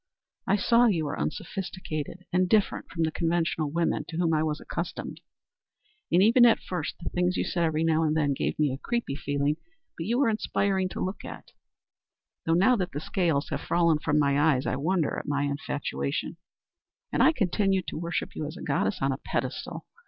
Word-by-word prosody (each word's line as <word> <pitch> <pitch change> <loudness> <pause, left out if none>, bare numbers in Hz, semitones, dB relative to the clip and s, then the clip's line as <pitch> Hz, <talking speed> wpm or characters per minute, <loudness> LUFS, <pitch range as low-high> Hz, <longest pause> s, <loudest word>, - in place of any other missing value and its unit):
I 190 - +4
saw 235 +4 +4
you 170 -8 +1
were 145 - -3
unsophisticated 185 -2 -4
and 180 0 +2
different 210 0 +1
from 165 - -1
the 160 - +1
conventional 165 -2 0
women 165 0 0
to 165 - -6
whom 170 -2 +2
I 155 - +2
was 155 -1 -1
accustomed, - - -5 0.9
and, 180 +2 +5
even 235 +3 +6
at 235 -2 +6
first, 175 -5 -4
the - - -4
things 180 +1 +1
you - - +1
said 170 -1 0
every 160 0 0
now 160 -1 +3
and 155 0 +1
then 145 -2 +2
gave - - -2
me 150 -3 +2
a 135 - -6
creepy 235 - -2
feeling, 145 +1 -1 0.4
but 165 - -5
you 235 +2 +1
were 275 - +3
inspiring 195 -3 0
to - - -6
look 190 +2 -5
at - - -9 1.0
though 165 - +4
now 200 +9 +5
that 185 -3 -2
the 145 - -2
scales 160 -3 0
have - - -3
fallen 170 -3 +2
from 150 -1 +1
my 140 -1 +3
eyes 145 -4 +3
I - - 0
wonder 160 +3 0
at - - -9
my 145 0 0
infatuation 145 +2 -3 0.7
and - - +1
I - - +7
continued 195 - +1
to - - -5
worship 170 0 -3
you 150 - -3
as 155 +4 -8
a - - -8
goddess 135 -7 0
on 135 - +2
a 135 - -3
pedestal. - - -4
165 Hz, 200 wpm, -27 LUFS, 150-185 Hz, 1.0 s, I